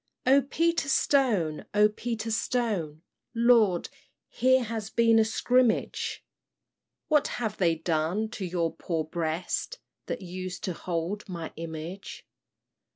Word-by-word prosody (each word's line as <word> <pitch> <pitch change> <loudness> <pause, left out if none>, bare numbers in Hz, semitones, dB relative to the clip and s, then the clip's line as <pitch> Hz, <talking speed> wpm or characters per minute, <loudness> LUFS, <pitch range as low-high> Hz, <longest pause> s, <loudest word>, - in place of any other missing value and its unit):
"O 270 +2 +6
Peter 330 +2 0
Stone, 220 - +2
O 210 0 +6
Peter 225 +1 -4
Stone, 210 - -1 0.3
Lord, 230 -6 +4 0.4
here 260 0 +3
has 220 -2 -4
been 230 -1 +4
a - - +6
skrimmage! 245 +2 +1 0.8
What 300 -2 +3
have 220 -4 -3
they 170 -3 +3
done 165 +6 0
to 215 -3 -6
your 170 -2 -1
poor 165 -1 -2
breast 165 - -3 0.3
That 245 - -4
used 185 0 -6
to 185 - -2
hold 175 +5 -4
my 170 -3 -6
image?" 165 +4 -7
205 Hz, 120 wpm, -28 LUFS, 170-235 Hz, 0.8 s, O